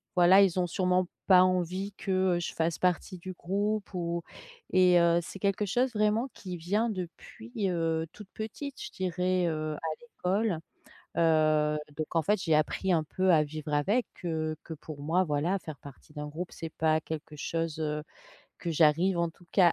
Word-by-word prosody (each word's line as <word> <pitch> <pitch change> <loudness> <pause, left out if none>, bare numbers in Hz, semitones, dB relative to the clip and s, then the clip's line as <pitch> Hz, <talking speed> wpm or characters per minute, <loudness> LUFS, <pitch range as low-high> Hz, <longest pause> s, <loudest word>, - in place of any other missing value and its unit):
voilà 180 +2 +7
ils 185 -2 +3
ont 180 - +2
sûrement 180 0 +1 0.2
pas 185 -1 +8
envie 185 +2 0
que, 185 -2 +1
heu, - - -1
je 175 - -4
fasse 165 0 -1
partie 180 +1 0
du 185 +2 -7
groupe» 200 +3 -2
ou 170 -1 -2 0.5
et 180 -1 +6
heu, 170 0 +4
c'est 185 - -8
quelque 200 +1 +1
chose 245 +6 +1
vraiment 215 +4 +1
qui 185 -3 -7
vient 205 +8 0
depuis, 205 +4 -7 0.2
heu, 165 -2 0
toute 210 -2 -12
petite 265 +6 -6
je - - -5
dirais, 185 0 0
heu, 155 -1 -2
à 160 +2 -4
l'école. 205 -4 -1 0.6
Heu, 155 -2 +3 0.2
donc 155 +2 -5
en 165 - +4
fait, 205 +4 +1
j'ai 160 -4 +2
appris 155 +5 +1
un 160 - +2
peu 185 +4 +1
à 155 -2 +5
vivre 150 0 -6
avec, 200 - +2 0.2
heu. 155 -2 -1
Que 165 - -7
pour 155 -1 -9
moi, 165 +6 +2
voilà, 160 +5 0
faire 155 -4 -8
partie 145 +2 -14
d'un 150 -1 -5
groupe 165 +5 -6
c'est 165 -1 -7
pas 155 0 +3
quelque 155 -1 -6
chose, 165 +1 -2
heu, 150 -1 -2 0.6
que 170 - -3
j'arrive, 165 +3 +3
en 170 - +2
tout 170 +1 -21
cas, 180 -3 +6
175 Hz, 185 wpm, -29 LUFS, 160-190 Hz, 0.6 s, pas